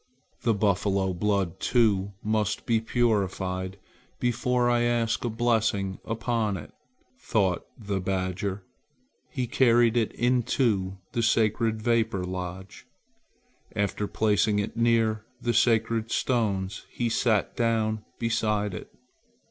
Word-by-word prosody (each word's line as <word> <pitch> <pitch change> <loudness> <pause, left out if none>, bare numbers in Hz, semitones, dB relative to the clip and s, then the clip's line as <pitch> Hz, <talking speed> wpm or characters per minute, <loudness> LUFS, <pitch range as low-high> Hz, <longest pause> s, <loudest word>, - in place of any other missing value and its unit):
"The 115 -2 +2
buffalo 100 -2 +1
blood, 95 -1 0
too, 100 -5 +2
must 105 -1 0
be 115 -2 +2
purified 95 -5 -1 0.4
before 125 0 +1
I 120 -1 +3
ask 120 -1 +1
a 120 - 0
blessing 110 -4 0
upon 115 -2 -1
it," - - -10 0.5
thought 95 -5 0
the 100 -4 -3
badger. 95 +1 -2 0.7
He 125 - -2
carried 120 -1 +4
it 115 -3 +1
into 120 -6 +1
the 120 - -1
sacred 110 0 +1
vapor 115 -5 +1
lodge. 90 +1 -6 0.9
After 100 0 -1
placing 105 -1 +2
it 105 +1 -2
near 115 -2 +2 0.2
the 120 - -1
sacred 115 -1 +2
stones, 100 -7 -1
he 120 - -2
sat 110 -2 +1
down 110 -2 0
beside 105 -3 0
it. - - -8
110 Hz, 115 wpm, -27 LUFS, 100-115 Hz, 0.9 s, carried